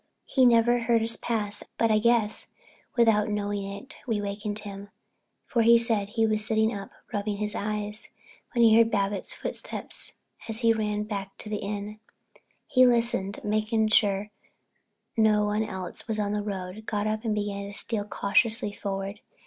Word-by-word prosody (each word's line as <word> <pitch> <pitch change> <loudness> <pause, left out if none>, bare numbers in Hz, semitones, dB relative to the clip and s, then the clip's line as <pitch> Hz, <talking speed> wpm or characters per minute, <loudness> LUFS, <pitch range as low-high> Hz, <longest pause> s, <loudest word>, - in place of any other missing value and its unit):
He 260 -2 +4
never 240 +1 +5
heard 230 -1 +2
us 230 0 0
pass, 210 -3 -2 0.2
but 230 -1 +3
I 215 - +4
guess 225 -1 +2 0.5
without 225 -3 +4
his 210 - -1
knowing 205 -1 -2
it 200 +5 -8
we 225 -3 0
wakened 205 +1 -3
him, 200 -1 -8 0.6
for 235 - +1
he 235 +1 +7
said 225 -4 +1
he 225 +1 +1
was 215 -1 +1
sitting 220 0 +1
up, 200 -1 -6 0.2
rubbing 205 0 -1
his 210 0 -2
eyes, 210 +1 -3 0.4
when 235 -4 +3
he 220 -1 +7
heard 230 0 +6
Babbitts' 200 -2 0
footsteps - - -6 0.4
as 225 +2 -2
he 230 -1 +5
ran 210 -1 -1
back 200 -2 -5
to 215 - -8
the 210 - -1
inn. 205 +1 -5 0.7
He 255 -1 +5
listened 230 -5 +1
and, 210 - -2
making 215 +1 +1
sure 205 -1 +2 0.8
no 215 -2 +4
one 210 +1 +1
else 190 -2 -6
was 220 -2 -1
on 205 -1 0
the 210 - 0
road, 200 +1 -5
got 205 -1 -1
up 215 +1 -1
and 220 -2 0
began 200 -1 -3
to 205 - -8
steal 220 -3 -2
cautiously 210 +2 +1
forward. 195 0 -4
210 Hz, 175 wpm, -27 LUFS, 205-225 Hz, 0.8 s, he